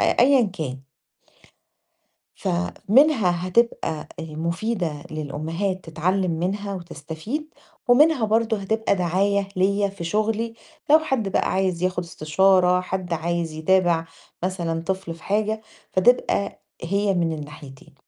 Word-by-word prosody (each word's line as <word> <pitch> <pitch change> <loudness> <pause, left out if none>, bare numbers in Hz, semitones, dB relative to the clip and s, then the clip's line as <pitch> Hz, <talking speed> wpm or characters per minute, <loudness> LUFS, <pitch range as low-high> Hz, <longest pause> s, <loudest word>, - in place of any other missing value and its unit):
أيًّا 265 +1 +5
كان. 160 - -3 1.6
فمنها 180 - +2
هتبقى 185 -7 0
آآ 160 - -5
مفيدة 170 -2 -2
للأمهات 160 +6 -3
تتعلم 180 +3 0
منها 200 +3 -2
وتستفيد، 170 - -6 0.3
ومنها 275 0 +5
برضو 220 +1 +2
هتبقى 205 +1 0
دعاية 195 +3 +1
ليّا 200 +2 +2
في 195 -3 -7
شغلي 220 +5 -1 0.4
لو 310 - +9
حد 265 -10 -1
بقى - - 0
عايز 185 -2 0
ياخد 180 -1 0
استشارة، 180 +3 +3
حد 180 -1 -4
عايز 165 0 -1
يتابع 170 +1 +2 0.4
مثلًا 170 -3 -2
طفل 190 -1 -3
في 165 - -17
حاجة، 215 +2 0 0.3
فتبقى 200 0 +2 0.2
هي 200 +3 +1
من 170 -2 +1
الناحيتين. 145 -3 -10
185 Hz, 115 wpm, -23 LUFS, 165-210 Hz, 1.6 s, لو